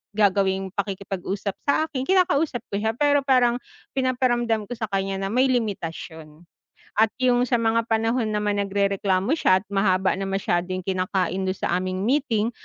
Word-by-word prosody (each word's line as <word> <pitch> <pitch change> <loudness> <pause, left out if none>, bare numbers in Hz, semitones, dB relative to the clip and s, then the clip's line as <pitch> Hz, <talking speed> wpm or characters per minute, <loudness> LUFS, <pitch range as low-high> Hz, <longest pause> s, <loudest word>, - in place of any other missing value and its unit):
gagawing 195 -2 +2
pakikipag-usap 200 0 -3 0.2
sa 285 +2 +3
akin, 275 -5 -4
kinakausap 325 -8 +2
ko 200 - -1
siya. 220 +1 -1
Pero, 285 +2 +3
parang 245 -2 +3 0.3
pinaparamdam 245 -4 +1
ko - - -18
sa 225 -2 -4
kaniya 195 -1 -2
na 195 - -2
may 255 +6 +2
limitasiyon. 165 -8 -4 0.4
At 220 +1 +3 0.2
yung 250 0 +3
sa 245 - +2
mga 230 0 +1
panahon 225 +1 +1
naman 210 -1 0
nagrereklamo 200 +1 0
siya 190 - +3
at - - -47
mahaba 190 -1 +2
na 195 - -3
masyado 185 -2 -1
yung 185 - -5
kinakain 185 0 -1
dun 185 - -1
sa - - -3
aming 185 +1 -3
meeting, 235 -3 +1
205 Hz, 160 wpm, -24 LUFS, 190-245 Hz, 0.4 s, sa